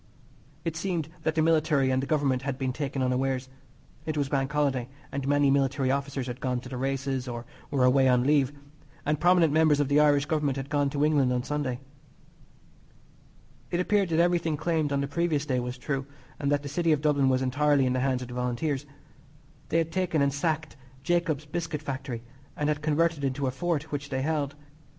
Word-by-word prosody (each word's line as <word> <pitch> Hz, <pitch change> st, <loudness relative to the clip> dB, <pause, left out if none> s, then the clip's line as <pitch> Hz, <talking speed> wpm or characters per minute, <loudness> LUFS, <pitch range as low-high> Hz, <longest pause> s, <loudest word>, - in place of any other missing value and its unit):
It 165 Hz, -1 st, -2 dB
seemed 170 Hz, -3 st, -2 dB
that 160 Hz, 0 st, -1 dB
the 160 Hz, -, +3 dB
Military 155 Hz, -4 st, +3 dB
and 130 Hz, 0 st, +1 dB
the 135 Hz, -, -4 dB
Government 140 Hz, -4 st, +1 dB
had 135 Hz, -1 st, -3 dB
been 130 Hz, -2 st, -1 dB
taken 135 Hz, -1 st, -2 dB
unawares. 130 Hz, 0 st, 0 dB, 0.5 s
It 155 Hz, -1 st, -3 dB
was 140 Hz, -2 st, 0 dB
Bank 135 Hz, -1 st, 0 dB
Holiday, 135 Hz, -4 st, 0 dB, 0.2 s
and 140 Hz, 0 st, -3 dB
many 145 Hz, -1 st, +3 dB
military 135 Hz, -1 st, +2 dB
officers 140 Hz, -1 st, -2 dB
had 125 Hz, 0 st, -6 dB
gone 125 Hz, -1 st, 0 dB
to 125 Hz, -, -10 dB
the 130 Hz, -, -6 dB
races, 135 Hz, 0 st, -2 dB
or 120 Hz, -1 st, -5 dB, 0.2 s
were 135 Hz, -3 st, +1 dB
away 130 Hz, +1 st, +5 dB
on 125 Hz, -1 st, +4 dB
leave, 140 Hz, -1 st, +3 dB, 0.5 s
and 150 Hz, 0 st, +1 dB
prominent 175 Hz, -3 st, +4 dB
members 155 Hz, -2 st, +4 dB
of 145 Hz, -2 st, +1 dB
the 145 Hz, +1 st, +4 dB
Irish 145 Hz, -1 st, +4 dB
Government 150 Hz, -3 st, 0 dB
had 135 Hz, +2 st, -6 dB
gone 145 Hz, -2 st, +2 dB
to 145 Hz, +1 st, +1 dB
England 145 Hz, -4 st, +3 dB
on 125 Hz, -1 st, 0 dB
Sunday. 140 Hz, -3 st, -2 dB, 1.9 s
It 175 Hz, -, -1 dB
appeared 195 Hz, 0 st, +2 dB
that 165 Hz, 0 st, +1 dB
everything 170 Hz, -3 st, +2 dB
claimed 155 Hz, -1 st, 0 dB
on 140 Hz, 0 st, +1 dB
the 140 Hz, -, -1 dB
previous 150 Hz, -1 st, 0 dB
day 130 Hz, -4 st, 0 dB
was 125 Hz, +1 st, -4 dB
true, 135 Hz, +1 st, -3 dB, 0.3 s
and 140 Hz, -1 st, 0 dB
that 145 Hz, 0 st, +1 dB
the -, -, -5 dB
City 165 Hz, +3 st, +1 dB
of 150 Hz, -, 0 dB
Dublin 140 Hz, -3 st, +3 dB
was 130 Hz, 0 st, +2 dB
entirely 145 Hz, +1 st, +2 dB
in 125 Hz, -, +1 dB
the 130 Hz, -, 0 dB
hands 130 Hz, -1 st, 0 dB
of -, -, -8 dB
the 125 Hz, -, -8 dB
Volunteers. 130 Hz, +4 st, -2 dB, 0.8 s
They -, -, +2 dB
had 165 Hz, -1 st, 0 dB
taken 175 Hz, -5 st, +1 dB
and 140 Hz, -1 st, +1 dB
sacked 155 Hz, +1 st, -1 dB, 0.3 s
Jacob's 170 Hz, -4 st, 0 dB
Biscuit 160 Hz, -1 st, -4 dB
Factory, 130 Hz, -4 st, -5 dB, 0.3 s
and 150 Hz, 0 st, 0 dB
had 150 Hz, 0 st, -1 dB
converted 160 Hz, +1 st, +1 dB
it -, -, +3 dB
into 135 Hz, +1 st, -2 dB
a 130 Hz, -, 0 dB
fort 160 Hz, +2 st, -2 dB
which 140 Hz, -1 st, -4 dB
they 130 Hz, -1 st, -1 dB
held. 145 Hz, -2 st, -1 dB
140 Hz, 205 wpm, -27 LUFS, 130-155 Hz, 1.9 s, away